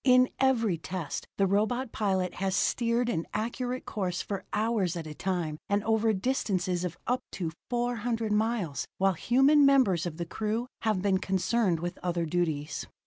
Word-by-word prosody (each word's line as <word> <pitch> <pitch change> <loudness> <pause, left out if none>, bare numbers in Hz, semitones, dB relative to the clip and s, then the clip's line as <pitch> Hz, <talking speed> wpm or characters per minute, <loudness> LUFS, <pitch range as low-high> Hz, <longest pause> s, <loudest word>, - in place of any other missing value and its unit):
In 255 -1 +6
every 230 -10 +2
test 175 -3 -5
the 195 - +3
robot 220 +6 +1
pilot 190 -4 0
has 190 -1 +1
steered 235 +3 +1
an 165 -8 -1
accurate 245 +3 -2
course 185 -4 -2
for 200 -1 -4
hours 210 -5 +1
at 165 -2 -4
a 155 - -6
time 170 -3 -2
and 200 0 +1
over 220 0 +2
distances 185 -5 0 0.2
up 250 +1 0
to 170 -4 -3 0.2
400 240 -2 -1
miles 210 -8 0
while 195 0 +3
human 270 - +4
members 250 - +4
of 160 -2 -6
the 170 - -3
crew 220 +6 -2 0.2
have 215 -4 0
been 195 -2 +3
concerned 190 -1 +1
with 175 +1 -4
other 175 -1 -1
duties. 155 -3 -2
205 Hz, 160 wpm, -29 LUFS, 180-235 Hz, 0.2 s, In